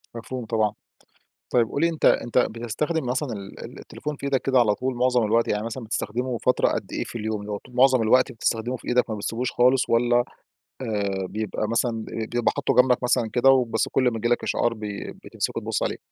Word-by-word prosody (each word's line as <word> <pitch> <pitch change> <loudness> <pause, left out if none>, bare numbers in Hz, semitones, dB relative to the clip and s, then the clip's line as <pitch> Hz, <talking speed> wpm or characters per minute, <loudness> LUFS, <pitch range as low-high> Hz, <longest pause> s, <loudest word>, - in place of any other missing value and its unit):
مفهوم 120 +1 -6
طبعًا. 110 -2 0 0.8
طيب 120 -2 +3
قُل 140 - -2
لي 170 - +4
أنتَ 165 -2 -2
أنتَ 120 +1 +3
بتستخدم 120 +7 -2
مثلًا 130 +3 -1
ال 100 -1 -9
ال - - -11
التليفون 150 0 -6
في 140 - -8
إيدك 135 -2 +1
كده 130 -1 +3
على 105 -4 +3
طول 130 0 -2
معظم 125 0 +2
الوقت، 115 +2 +2
يعني 105 +1 -1
مثلًا 115 +2 -5
بتستخدمه 120 +3 -2
فترة 125 - +2
قد - - -3
إيه - - -1
في - - -7
اليوم، 110 -1 -3
اللي 105 0 -7
هو 105 - -2
ط 125 - -17
مُعظم 130 0 +4
الوقت 125 +4 +3
بتستخدمه 115 +1 -1
في - - -15
إيدك 125 0 +2
ما 110 - -2
بتسيبوش 115 +4 -3
خالص، 125 +1 +3
والّا 120 +1 +3 0.6
آآ 100 -5 -2
بيبقى 110 0 -3
مثلًا 120 +1 +1
بي 110 0 -5
بيبقى 120 0 +1
حاطُّه - - 0
جنبك 125 0 +4
مثلًا 120 -2 +1
كده، 125 +2 +4
وبس 125 -4 +3
كُل 135 - +1
ما 125 -2 +2
ييجي 115 +1 -1
لك 120 0 +1
إشعار 120 - +1
بي 105 -2 -6
بتمسكه - - -3
تبُص - - -2
عليه؟ - - -2
120 Hz, 215 wpm, -24 LUFS, 110-125 Hz, 0.8 s, لي